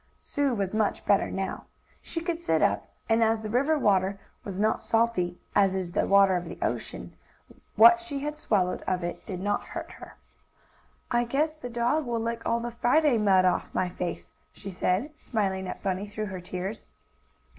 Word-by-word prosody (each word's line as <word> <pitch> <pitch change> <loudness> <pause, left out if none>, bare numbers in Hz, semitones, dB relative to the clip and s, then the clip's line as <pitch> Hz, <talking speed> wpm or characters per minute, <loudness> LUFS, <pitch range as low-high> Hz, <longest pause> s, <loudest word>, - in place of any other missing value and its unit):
Sue 280 -3 -1
was 195 -2 -2
much 215 -1 0
better 200 - +3
now. 190 0 -4 0.4
She 330 - -5
could 335 -1 -2
sit 340 - +1
up, - - +1 0.2
and, 225 0 +3
as 225 0 +2
the 215 -1 -5
river 280 +6 +2
water 195 -5 +2 0.2
was 195 -1 -5
not 215 +1 +1
salty, 225 -6 +1 0.2
as 195 -2 +3
is 185 -2 -3
the - - 0
water 195 -1 +5
of 175 0 -2
the 170 - -8
ocean, - - -3 0.6
what 350 0 +8
she 300 -6 -5
had 300 +1 -3
swallowed 195 -11 0
of 185 -1 0
it 175 - -4
did 185 -4 -4
not 205 +2 0
hurt - - -7
her. - - -12 1.0
"I 240 -1 +3
guess 290 +6 0
the 280 -6 -8
dog 240 +5 0
will 235 -1 -1
lick 230 +1 -2
all 230 - +2
the 240 0 -4
Friday 250 +2 +3
mud 190 -3 +4
off 180 -1 0
my 185 - +1
face," 180 -1 -5 0.2
she 195 - -8
said, 185 - 0
smiling 190 -4 -2
at - - -7
Bunny 195 +1 -1
through 215 +1 -4
her 185 - -5
tears. 185 +4 -5
215 Hz, 190 wpm, -27 LUFS, 190-245 Hz, 1.0 s, what